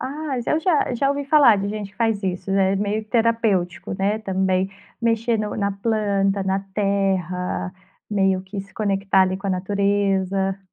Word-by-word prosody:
Ah, 285 0 -4
eu 310 - +1
já 315 -7 +1
já 275 +3 +1
ouvi 280 0 -1
falar 280 -7 +6
de 200 0 -2
gente 205 -1 -5
que - - -29
faz 225 -3 0
isso, 185 0 -3
é 195 0 +2
meio 205 +2 -1
terapêutico, 215 -7 0
né, 205 +2 0
também 190 -2 0 0.3
mexer 230 0 +1
no 210 0 -3
na 200 -1 0
planta, 200 -2 0
na 190 0 0 0.2
terra, 190 -3 -1 0.4
meio 195 -2 +1
que 195 +1 -6
se 195 - -14
conectar 195 -2 +1
ali 185 0 0
com 195 +1 -7
a - - 0
natureza 195 0 0
200 Hz, 170 wpm, -22 LUFS, 190-220 Hz, 0.4 s, falar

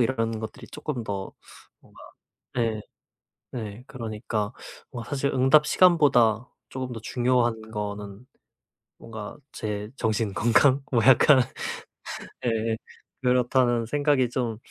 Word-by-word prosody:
일하는 115 -2 0
것들이 110 - -7
쪼끔 130 -7 -5
더 100 -2 -4 0.5
뭔가 - - -19 0.6
네 115 -3 0 0.7
네 110 -1 -6
그러니까 110 -3 -3 0.4
뭔가 120 -3 -7
사실 140 0 0
응답 135 +4 +5
시간보다 130 - +4 0.2
쪼금 130 -1 -4
더 115 - -6
중요한 120 -1 +1
거는 105 +1 -5 0.7
뭔가 110 -2 -8 0.2
제 105 -1 -4
정신 110 -3 0
건강 120 +6 +4
뭐 115 - +4
약간 130 +1 +7 1.0
예 115 -1 0 0.4
그렇다는 125 -1 +2
생각이 145 -2 +2
좀 120 -4 -2
120 Hz, 220 characters per minute, -26 LUFS, 110-130 Hz, 1.0 s, 약간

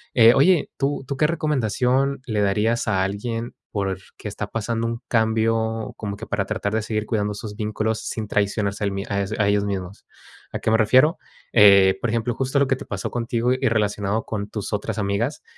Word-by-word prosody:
eh, 115 0 +8
oye, 165 +4 +4
¿tú 140 -1 -1
tú 140 - -3
qué 150 - +3
recomendación 135 -3 0
le 110 -3 -1
darías 105 +4 +1
a 95 -3 +2
alguien 115 +4 -3 0.2
porque, 95 -2 -4
está - - -5
pasando 115 +1 -2
un 115 +1 -4
cambio 110 -1 0
como 100 -2 -5
que - - -7
para - - -1
tratar 100 +1 -3
de 110 - +1
seguir 110 0 -2
cuidando 105 -1 -1
sus 105 0 -7
vínculos 110 +1 -2
sin 110 -2 -4
traicionarse 100 0 -1
a - - +2
él - - -1
mi 95 0 -3
ah, 100 0 -1
e 100 +1 -1
ellos 100 0 +2
mismos? 95 -1 -5 0.5
¿A - - -3
qué 110 - 0
me 110 - +5
refiero? 130 - +4 0.4
Eh, 100 -3 +7
por 120 - 0
ejemplo, 115 +1 0
justo 135 +1 -1
lo 140 - +3
que 135 - +2
te - - -9
pasó 100 -1 -4
contigo 120 +1 0
y 130 - 0
relacionado 105 -1 0
con 100 -1 -4
tus 105 0 -5
otras 105 +1 -2
amigas, 105 +7 -1
110 Hz, 200 wpm, -23 LUFS, 100-120 Hz, 0.5 s, eh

